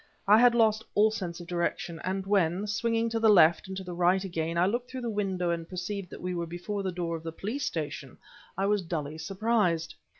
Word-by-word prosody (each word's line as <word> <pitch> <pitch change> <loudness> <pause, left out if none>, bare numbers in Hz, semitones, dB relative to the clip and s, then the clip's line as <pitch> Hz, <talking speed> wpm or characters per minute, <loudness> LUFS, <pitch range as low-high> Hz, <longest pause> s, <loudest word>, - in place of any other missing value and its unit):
I 210 +2 +7
had 245 0 +6
lost 220 -1 +3
all 215 +1 +5
sense 180 -5 -5
of - - -9
direction, 170 -1 -2
and 190 +1 -2
when, 190 -1 +1
swinging 225 +2 0
to 225 0 -1
the 225 -1 +4
left 170 -4 +5
and 190 0 -6
to 190 - -5
the 180 -1 -7
right 180 +2 +2
again, 165 -3 -3
I 175 - +4
looked 240 +5 -1
through 260 -1 -6
the 235 -2 -2
window 190 -4 -1
and 165 -1 -4
perceived 185 +1 -4
that - - -10
we 180 0 -2
were 170 -1 -3
before 180 +5 -4
the 190 -1 -2
door 170 -1 -3
of 165 - -6
the 165 0 -5
Police 220 - -4
Station, 145 -4 -4 0.4
I 195 - +1
was 205 0 +2
dully 155 -3 -4
surprised. 195 -5 0
185 Hz, 230 wpm, -28 LUFS, 170-210 Hz, 0.4 s, I